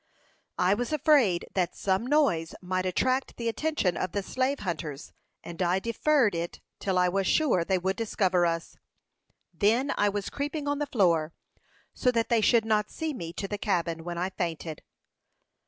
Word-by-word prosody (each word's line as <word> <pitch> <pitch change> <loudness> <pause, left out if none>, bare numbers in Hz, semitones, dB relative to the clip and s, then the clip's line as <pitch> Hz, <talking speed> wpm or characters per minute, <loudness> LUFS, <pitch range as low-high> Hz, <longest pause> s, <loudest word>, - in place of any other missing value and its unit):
"I 180 +2 +3
was 245 +6 -2
afraid 280 - +3
that 180 -2 0
some 195 +4 0
noise 260 - +2
might 185 0 -2
attract 255 +8 0
the 235 - -3
attention 230 - 0
of 185 - -3
the 200 - -1
slave 260 +6 -1
hunters, 155 -6 -5 0.3
and 170 +1 -7
I 180 +1 +2
deferred 230 +2 +2
it 170 0 -4 0.2
till 190 -2 -1
I 180 0 +4
was 195 +1 0
sure 275 - +3
they 190 +2 +1
would 190 +2 -1
discover 190 -5 +1
us. 165 0 -3 0.8
Then 235 +7 +2
I 205 - +2
was 200 0 -3
creeping 290 +1 -3
on 285 0 0
the 295 - -1
floor, 170 - +2 0.6
so 255 - +1
that 230 -1 0
they 235 -2 +3
should 225 +1 +4
not 210 -1 +1
see 320 -2 -3
me, 170 -10 -6
to 195 - -4
the 205 +1 -4
cabin, 170 -5 -1
when 175 0 -5
I 180 +2 -1
fainted." 165 -4 -4
195 Hz, 175 wpm, -28 LUFS, 175-245 Hz, 0.8 s, I